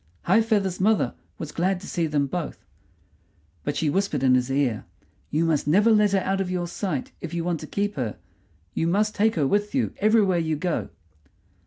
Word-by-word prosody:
High 200 +6 +4
feather's 205 -5 0
mother 215 +2 +2 0.2
was 155 -2 -6
glad 180 +3 0
to - - -9
see 170 -2 -1
them 145 -2 +1
both; 160 +3 -5 1.0
but - - -2
she 160 - 0
whispered 155 -4 0
in 130 -1 +5
his 125 0 +2
ear: 135 -5 0 0.4
"You 160 +3 +1
must 155 -3 +1
never 205 +9 +5
let 210 -2 +4
her 195 - +3
out 195 +1 0
of 185 - -2
your 180 -1 -1
sight 175 -4 -3
if 170 0 -5
you 170 - -1
want 170 -2 -1
to - - -8
keep 205 +1 -1
her; 120 -5 -3 0.6
you 165 - 0
must 210 +5 +1
take 220 +2 +2
her 150 -5 +1
with 205 - 0
you 260 - 0
everywhere 205 -4 +3
you 160 -1 0
go." 175 +3 -2
180 Hz, 200 wpm, -25 LUFS, 155-205 Hz, 1.0 s, in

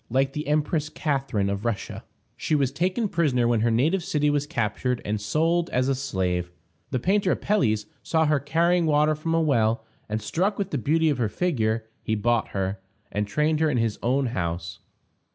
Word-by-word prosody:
Like 135 +3 +1
the 150 -1 -4
Empress 150 0 0
Catharine 135 - -1
of 100 +1 -2
Russia, 115 -4 -3 0.3
she 155 - 0
was 135 -3 +1
taken 185 - 0
prisoner 140 -10 +1
when 120 -2 +2
her 115 - +2
native 155 +11 +2
city 150 -3 +1
was 145 0 0
captured, 120 -2 -1
and 105 0 -2
sold 165 +10 +1
as 125 +1 +1
a 135 - +2
slave. 95 -10 -1 0.4
The 130 - -1
painter 190 - +2
Apelles 110 - +1 0.2
saw 160 -1 +1
her 150 -1 +2
carrying 170 +4 +2
water 150 0 +3
from 165 +2 -2
a 165 - +3
well, 115 -6 +1 0.2
and, 110 +1 -1
struck 180 - -1
with 200 -1 -3
the 145 - -1
beauty 160 +5 +2
of 135 - -2
her 115 -3 +1
figure, 110 - 0
he 110 - -1
bought 115 +2 +1
her, 95 0 -3 0.3
and 105 0 -1
trained 150 +7 +1
her 160 -1 +3
in 135 - 0
his 115 -2 0
own 130 +3 +1
house. 85 -1 -3
135 Hz, 190 wpm, -25 LUFS, 110-160 Hz, 0.4 s, water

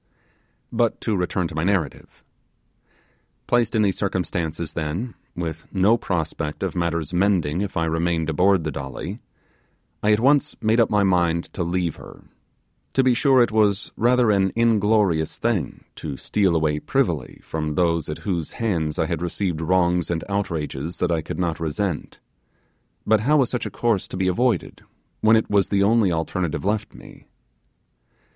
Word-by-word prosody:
But 115 -1 +1
to 110 - 0
return 90 -1 -1
to - - -9
my 80 +1 -1
narrative. 90 -6 -2 1.2
Placed 120 -1 +1
in 110 - +3
these 95 -2 0
circumstances 85 -4 -2
then, 85 +9 -3 0.2
with 80 -2 -5
no 100 +4 +4
prospect 80 -7 -3
of - - -2
matters 85 -2 -1
mending 90 -3 +1
if 100 -3 -3
I 80 - +1
remained 80 0 0
aboard 90 +3 +3
the - - -2
Dolly, 75 - -6 0.8
I 105 - +3
at 105 - +4
once 140 +4 +3
made 110 +2 +2
up 115 - +4
my 105 -1 +3
mind 85 -3 +1
to - - -4
leave 85 -1 -1
her: - - -13 0.7
to 135 - +4
be 130 -1 +4
sure 130 0 +4
it 120 - -1
was 105 -2 +1
rather 120 -1 +3
an 95 -2 +2
inglorious 105 -7 +2
thing 110 - -2
to 70 -4 -5
steal 95 -5 +1
away 75 -2 +1
privily - - -1
from 75 -1 -3
those 85 -2 +1
at 75 - -3
whose 85 -6 -2
hands 85 -9 -1
I - - +1
had 85 -1 -3
received 90 -1 -2
wrongs 90 0 +2
and 85 -1 -1
outrages 85 -5 -3
that 90 - 0
I 80 -1 +1
could - - -6
not 85 -3 -1
resent; 80 +2 -3 0.9
but 110 0 +4
how 145 +8 +3
was 130 -4 +2
such 125 - -2
a - - -5
course 115 -5 0
to - - -6
be 95 0 0
avoided 120 +7 0 0.4
when 110 +1 +5
it 110 - +2
was 100 -1 +2
the 100 -1 +2
only 105 -2 +3
alternative 85 +1 -2
left 105 +1 -1
me? - - -14
90 Hz, 165 wpm, -23 LUFS, 80-105 Hz, 1.2 s, when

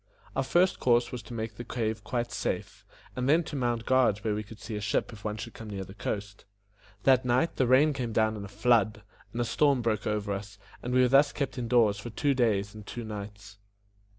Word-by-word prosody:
Our - - +2
first 175 +7 +2
course 120 -1 +3
was 125 - -5
to 105 +3 -11
make 110 -2 -4
the 120 - -5
cave 110 -3 -3
quite 120 +2 -2
safe, - - -4 0.3
and 125 +1 -1
then 165 +4 +5
to 150 - -7
mount 120 -4 -1
guard 130 -6 +3
where 110 -2 0
we 105 - -2
could 110 +1 -11
see 110 0 -6
a 105 - -3
ship 105 +3 -1
if 105 - -12
one 105 0 -3
should 110 - -7
come 110 -1 -9
near 100 -2 -4
the 95 0 -11
coast. 100 -1 -5 0.6
That 130 -1 +5
night 125 +6 +1
the 130 - +2
rain 140 +5 +5
came 125 -4 -3
down 110 0 +2
in 105 - -6
a - - -6
flood, 110 0 +2 0.3
and 120 - -5
a 120 - +1
storm 140 0 +2
broke 110 -2 0
over 105 -1 -1
us, 100 +1 -6 0.2
and 125 - -4
we 130 0 +4
were 125 - +5
thus 140 +3 +5
kept 135 -2 -3
in 120 - -3
doors 115 -4 +3
for 120 - -6
two 140 +5 +1
days 105 -6 +1
and 105 -1 -10
two 120 - -5
nights. 100 -1 -8
115 Hz, 235 wpm, -29 LUFS, 105-125 Hz, 0.6 s, then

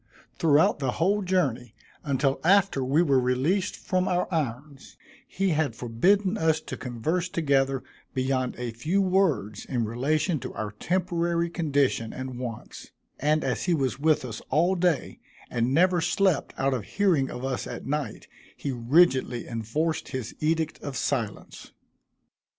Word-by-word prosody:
Throughout 155 -1 +4
the 130 -3 -1
whole 200 +5 +1
journey, 140 - -1 0.3
until 140 -1 0
after 190 -5 +3
we 140 +6 +3
were 140 -5 +3
released 135 +11 0
from 185 0 -1
our 180 -1 +1
irons, 140 -1 -4 0.3
he 195 0 -1
had 155 -7 0
forbidden 185 - +1
us 160 -1 +2
to - - -7
converse 155 +9 -2
together 135 -5 +1 0.3
beyond 130 -1 0
a 125 -1 -4
few 155 - -1
words 180 - +1
in 120 -4 -1
relation 150 - 0
to - - -7
our 105 -1 -3
temporary 170 - -1
condition 140 -9 0
and 130 -1 -6
wants; 120 -3 -7 0.3
and 155 +2 +2
as - - -1
he 175 -2 +2
was 135 -3 -1
with 155 -2 +2
us 115 -3 -6
all 175 +5 +3
day, 175 -5 0 0.3
and 120 +1 0
never 175 +4 +3
slept 175 0 +1
out 135 0 +1
of 125 -5 -2
hearing 170 - +1
of 125 +2 -5
us 130 -2 -2
at - - -7
night, 150 0 -3 0.3
he 140 - -3
rigidly 130 0 +2
enforced 125 +8 -2
his 130 -4 -5
edict 160 0 -1
of 140 -2 -5
silence. 115 -7 -3
145 Hz, 150 wpm, -26 LUFS, 125-175 Hz, 0.3 s, Throughout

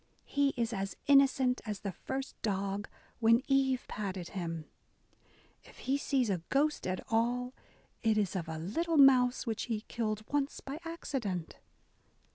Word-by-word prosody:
He 280 -1 +1
is 230 -1 0
as 195 -1 -3
innocent 270 -2 +4
as 210 -4 -5
the 200 - -3
first 265 +8 -5
dog 200 -1 -2 0.3
when 230 +2 +5
Eve 270 -2 +2
patted 190 -4 -4
him... 165 -4 -4 1.0
If - - -17
he 265 - 0
sees 275 -3 +1
a 180 -3 -1
ghost 295 -2 +1
at 185 0 -2
all, 245 +3 +1 0.5
it 220 -2 +2
is 200 -3 0
of 170 -3 -3
a 160 - -4
little 320 - -1
mouse 255 -3 +6
which 225 -3 -2
he 225 -3 -2
killed 215 -2 -2
oooe 285 +2 -2
by 275 +3 -5
accident 250 - -4
235 Hz, 150 wpm, -32 LUFS, 195-270 Hz, 1.0 s, mouse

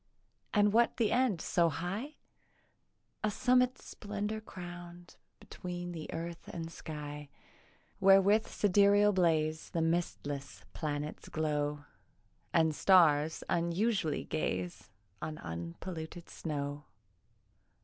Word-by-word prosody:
And 205 -1 +4
what 235 +1 +3
the 225 -3 +2
end 240 -9 +2
so 170 -1 +2
high? 195 - -4 1.1
A 215 - +3
summit 250 +3 +3
splendour 210 +1 -5
crown'd 175 -3 -10 0.2
Between 175 -1 -6
the 160 -3 -6
earth 170 +1 -6
and 165 -1 -6
sky, 150 -2 -7 0.7
Where 195 0 +8
with 205 +3 +3
sidereal 205 +1 +4
blaze 160 -4 +1
The 170 - -2
mistless 145 - -2
planets 145 +7 -4
glow, 150 -1 -1 0.7
And 160 -2 +3
stars 160 -3 +4
unsully'd 170 0 0
gaze 90 - -2 0.3
On 155 -1 -4
unpolluted 160 - -6
snow. 145 -2 -4
170 Hz, 100 wpm, -32 LUFS, 150-200 Hz, 1.1 s, Where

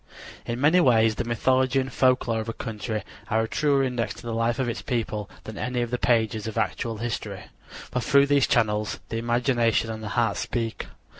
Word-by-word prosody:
In 120 +1 -2
many 155 +6 +5
ways 115 -7 +4
the 120 - -3
mythology 130 +3 +2
and 130 -1 -3
folklore 125 -3 +2
of 110 +1 -4
a - - -3
country 110 -2 -4 0.3
are 110 +1 +2
a - - -2
truer 140 +2 +2
index 125 -4 -2
to - - -12
the 115 -1 -4
life 115 +1 0
of 130 -2 0
its 115 - -3
people 110 -4 -2
than 110 - -8
any 125 -1 -1
of 120 - -5
the 125 - -1
pages 110 -3 +1
of 110 - -5
actual 115 -2 -1
history; 115 +1 -4 0.5
for 125 - 0
through 140 +4 +5
these 140 -2 +3
channels 105 -1 +1
the 115 - -3
imagination 120 -1 +1
and 110 0 -6
the 110 - -5
heart 115 -4 +2
speak. 115 -2 -3
120 Hz, 205 wpm, -25 LUFS, 110-125 Hz, 0.5 s, many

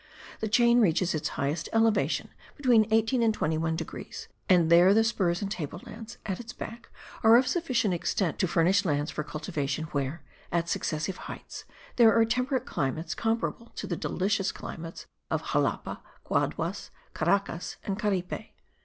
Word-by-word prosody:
The 220 - -1
chain 235 +2 +5
reaches 180 -2 +2
its 155 - -1
highest 145 +4 -2
elevation 225 -1 +2 0.3
between 240 -7 +4
18 225 +3 +2
and 225 -1 +4
21 160 -4 0
degrees; - - -7 0.2
and 170 -3 +5
there 180 +4 +7
the 225 - +5
spurs 190 -6 0
and 195 - -3
table 170 -4 -4
lands 225 +1 -9
at 190 -3 -3
its 240 0 -8
back 230 +2 -8 0.3
are 225 +1 +8
of 255 - +4
sufficient 255 - +1
extent 175 0 -1
to 185 - +2
furnish 180 +4 +3
lands 145 -4 0
for 150 - -3
cultivation 150 -2 -3
where, 145 +2 -2 0.3
at 170 0 0
successive 165 +2 -2
heights, - - -8 0.3
there 230 -2 +7
are 225 - +6
temperate 250 +2 0
climates 160 +5 -2
comparable 230 +3 -1
to - - -4
the 175 - -2
delicious 195 +3 0
climates 165 0 -8 0.2
of - - -2
Xalapa, - - -1 0.2
Guaduas, - - -1 0.2
Caracas 195 -4 0
and 195 +1 -3
Caripe. 195 -4 -2
195 Hz, 155 wpm, -28 LUFS, 165-225 Hz, 0.3 s, are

